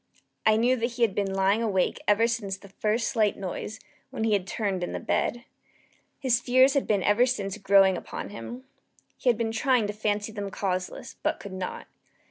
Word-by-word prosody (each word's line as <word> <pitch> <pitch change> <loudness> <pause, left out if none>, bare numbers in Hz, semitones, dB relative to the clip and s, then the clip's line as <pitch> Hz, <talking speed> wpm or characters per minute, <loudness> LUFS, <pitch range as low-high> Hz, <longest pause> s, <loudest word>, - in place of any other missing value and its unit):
I 215 0 +5
knew 245 +3 +3
that 235 +1 -2
he 240 0 0
had 220 -4 +3
been 200 -1 -1
lying 195 +3 +2
awake 200 -5 0
ever 210 +2 +4
since 220 -5 -2
the 200 +1 -15
first 215 +4 0
slight 215 -3 +1
noise, 200 +3 -5 0.3
when 260 -4 -4
he 220 -1 +2
had 195 -2 0
turned 195 -4 -2
in - - -3
the - - -3
bed. 240 0 -1 0.7
His 245 -3 +2
fears 255 +2 +5
had 280 - 0
been 205 -3 +2
ever 235 +5 +4
since 200 -6 -2
growing 195 -1 +5
upon - - -6
him. 240 +5 -8 0.5
He 255 - 0
had 235 - +3
been 225 -1 -1
trying 245 0 +2
to 205 - -3
fancy 210 0 -1
them 205 -2 -5
causeless, 185 -2 -4
but - - 0
could 200 - -8
not. 185 -1 -5
210 Hz, 200 wpm, -27 LUFS, 195-235 Hz, 0.7 s, I